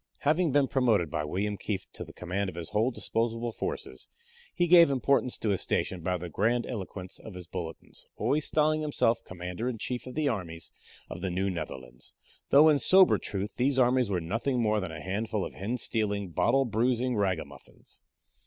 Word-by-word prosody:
Having 155 +2 +2
been 140 0 +3
promoted 110 - +2
by 75 - -1
William 100 +6 -2
Kieft 100 -1 -5
to - - -6
the - - -11
command 95 +3 -3
of 90 - -10
his 85 -2 -6
whole 110 +4 +2
disposable 115 -1 -2
forces, - - -5 0.4
he 175 - +1
gave 170 -2 +7
importance 135 -1 +1
to 110 - -2
his 95 -3 0
station 90 -2 -1
by 90 +2 -1
the 90 0 -6
grandiloquence 100 -1 -2
of 110 - -10
his 90 -1 -8
bulletins, 85 -2 -8
always 150 +1 0
styling 155 0 +2
himself 120 -6 +1
Commander 90 +6 -5
in 120 - -4
Chief 125 +3 -4
of 130 - -8
the 155 -1 +1
Armies 85 -9 -4 0.4
of - - -8
the 95 - -1
New 95 +2 -1
Netherlands, 65 -7 -8 0.3
though 145 +3 +7
in 150 -2 +5
sober 190 +4 +6
truth 100 +1 -4
these 130 +2 +1
armies 125 -2 +3
were 95 -3 0
nothing 115 +10 -1
more 110 -2 +2
than 95 -4 -4
a 80 - -7
handful 105 +2 -2
of - - -8
hen 110 +6 -3
stealing, 105 -4 -1
bottle 135 +10 +2
bruising 120 +2 0
ragamuffins. 95 -5 -4
110 Hz, 185 wpm, -29 LUFS, 95-130 Hz, 0.4 s, gave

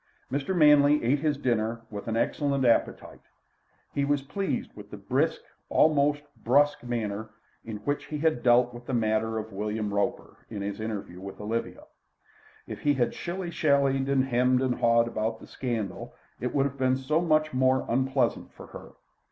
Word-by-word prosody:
Mr. 140 +7 -1
Manley 150 -2 +5
ate 130 +5 +2
his 150 -1 0
dinner 115 -4 -1
with 105 +1 -7
an 115 0 -1
excellent 140 +2 0
appetite. 115 - 0 0.7
He 140 - 0
was 140 -1 +1
pleased 195 +8 -3
with - - -11
the - - -8
brisk, - - 0 0.3
almost 145 -1 +3 0.2
brusque, 145 +4 +3
manner 110 -3 -3 0.3
in 110 -2 -6
which 145 0 -1
he 150 - -5
had 155 -4 +1
dealt 120 0 +4
with 120 0 -11
the 130 - -1
matter 110 0 0
of 110 -1 -6
William 105 +1 -3
Roper, 100 0 -2
in 105 -3 -5
his 100 +1 -4
interview 105 -5 -5
with 95 0 -8
Olivia. 110 +3 -4 0.8
If - - -7
he 145 -1 +2
had 125 -2 0
shilly 175 0 -5
shallied 140 -4 +2
and 135 -1 +2
hummed 125 +1 +2
and 130 -1 +1
hawed 115 0 +3
about 110 0 -2
the - - -12
scandal, 115 -7 -4 0.2
it 125 - -2
would 140 -1 +2
have 140 -1 -4
been 130 0 +2
so 150 +5 0
much 155 -3 +2
more 130 0 +2
unpleasant 130 +3 0
for - - -12
her. - - -12
130 Hz, 175 wpm, -27 LUFS, 110-145 Hz, 0.8 s, Manley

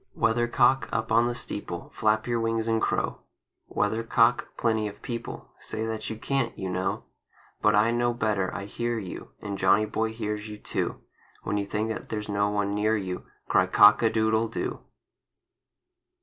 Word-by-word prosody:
WEATHERCOCK, 120 +3 +3
up 115 0 -2
on 115 +1 +5
the 120 - -2
steeple, 90 -7 -6
Flap 110 0 +1
your 120 -1 0
wings 115 0 0
and 115 -1 +1
crow! - - 0 0.5
Weathercock, 115 +2 +2
plenty 110 -2 +1
of 100 - -10
people 120 -1 -6
Say 110 - -4
that 110 -1 -3
you 110 - -5
can't, 130 -1 -1
you 95 -2 -3
know. 90 +1 -1 0.6
But - - +4
I 110 +3 +4
know 120 0 +2
better! 105 -5 0
I 95 +3 -5
hear 120 +3 -2
you, 95 -5 -7
And 100 -2 -4
Johnny 100 +3 +4
Boy 110 +1 -1
hears 105 -1 -4
you, 105 - -7
too, - - -3 0.4
When 105 - -1
you 100 -1 -2
think 110 +2 -1
that 110 - -5
there's 105 -1 -4
no 100 0 +1
one 105 -1 0
near 105 +2 +2
you, 90 -3 -5 0.2
Cry - - +3
"Cock 105 +1 +7
a 115 - +4
doo 110 0 +1
doodle 110 +1 +2
do!" 115 - -3
110 Hz, 175 wpm, -27 LUFS, 105-115 Hz, 0.6 s, Cock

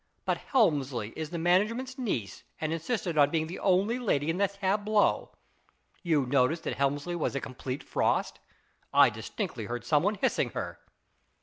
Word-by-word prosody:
But - - +1
Helmsley 140 - +1
is 155 -1 -4
the 170 - -4
management's 210 +10 +1
niece, 130 - -3 0.2
and 155 0 -1
insisted 170 -1 -1
on 145 - +6
being 160 -1 0
the 170 +3 -7
only 200 +6 +2
lady 165 - +1
in 170 - -3
the 200 +1 +3
tableau. 205 +2 +1 0.7
You 155 -6 +2
noticed 135 +5 +2
that - - -2
Helmsley 145 +5 0
was 165 - -1
a - - +1
complete 130 +1 -6
frost? - - 0 0.5
I - - +6
distinctly - - -5
heard 120 0 -5
some 145 +3 +3
one 205 +4 +1
hissing 200 - 0
her." - - -4
165 Hz, 165 wpm, -29 LUFS, 140-200 Hz, 0.7 s, on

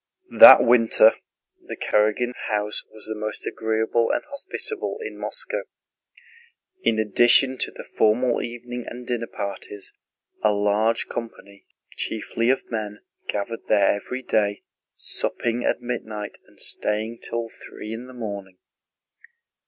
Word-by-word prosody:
That - - +12
winter 115 -2 +6 0.5
the - - -7
Karágins' 110 +4 0
house 105 0 0
was 110 -1 -4
the 110 - -1
most 110 0 -4
agreeable 110 +1 0
and - - 0
hospitable 340 +8 -4
in 450 - -6
Moscow. - - -3 1.2
In 110 - +2
addition 120 +4 +4
to - - +1
the - - -10
formal 120 +3 +2
evening 120 +1 -6
and 125 +1 -8
dinner 120 -1 -2
parties, 100 0 -5 0.5
a 105 - +5
large 105 +3 +1
company, 100 -4 -8 0.3
chiefly 115 +2 -2
of 130 -1 0
men, 105 -2 -4 0.2
gathered 105 +3 -4
there 100 -2 +4
every 125 +6 -5
day, 105 -4 0 0.3
supping 120 0 -2
at - - 0
midnight 110 -4 -5
and - - -23
staying 110 +2 0
till 115 0 -4
three 110 -1 -9
in 120 +3 -7
the 130 - -12
morning. 100 -5 -6
110 Hz, 130 wpm, -24 LUFS, 105-120 Hz, 1.2 s, That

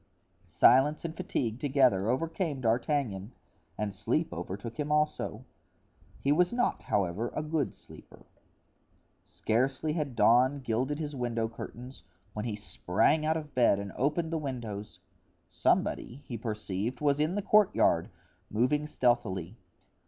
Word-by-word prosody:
Silence 140 +6 +4
and 160 -1 -4
fatigue 115 -6 -2
together 130 -8 +3
overcame 160 +2 -1
D'Artagnan 115 -3 0 0.4
and 105 -1 -2
sleep 125 +11 -1
overtook 100 - -6
him 150 0 -2
also. 150 0 0 0.7
He 140 - +1
was 175 +4 +3
not, 245 0 0
however, 100 +4 -1
a 150 - -1
good 150 -3 -1
sleeper. - - -15 1.0
Scarcely 130 +6 -1
had 150 -6 -3
dawn 125 +6 +4
gilded 130 +4 -1
his 150 -2 -4
window 120 -3 -1
curtains 125 +3 -9 0.3
when 105 +1 -4
he 110 -3 -2
sprang 110 - +1
out 160 +1 +2
of 150 -2 -8
bed 120 -5 +4
and 100 -1 -5
opened 160 +5 0
the 165 - 0
windows. 115 -8 -6 0.5
Somebody, 135 +5 0
he 120 - -6
perceived, 110 +1 -3
was 145 -1 +2
in 155 +5 +1
the 205 - -1
courtyard, 195 - +3 0.4
moving 130 +7 +1
stealthily. 105 - 0
130 Hz, 130 wpm, -30 LUFS, 110-150 Hz, 1.0 s, Silence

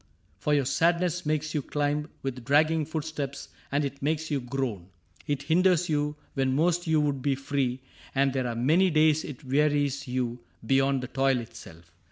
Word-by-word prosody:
For 150 +6 +1
your 140 -2 +2
sadness 170 +3 +1
makes 155 0 -1
you 150 - 0
climb 145 +2 -1
With 130 -2 -4
dragging 155 +4 +3
footsteps, 150 -3 -4 0.2
and 145 +1 +1
it 140 0 -6
makes 155 +2 -1
you 145 - +1
groan; 120 -8 -3 0.4
It 145 -1 -1
hinders 175 +3 +3
you 150 -1 0 0.2
when 135 -1 +1
most 175 +3 +1
you 160 -1 +3
would 145 -3 0
be 140 0 +1
free. 135 -2 -2 0.3
And 135 0 +2
there 130 -2 -1
are 120 - -3
many 160 +11 +3
days 155 -1 +3
it 145 0 -8
wearies 140 0 +1
you 125 -1 -2 0.3
Beyond 135 +1 +2
the - - -4
toil 135 0 +1
itself. 85 -8 -11
145 Hz, 175 wpm, -27 LUFS, 130-155 Hz, 0.4 s, dragging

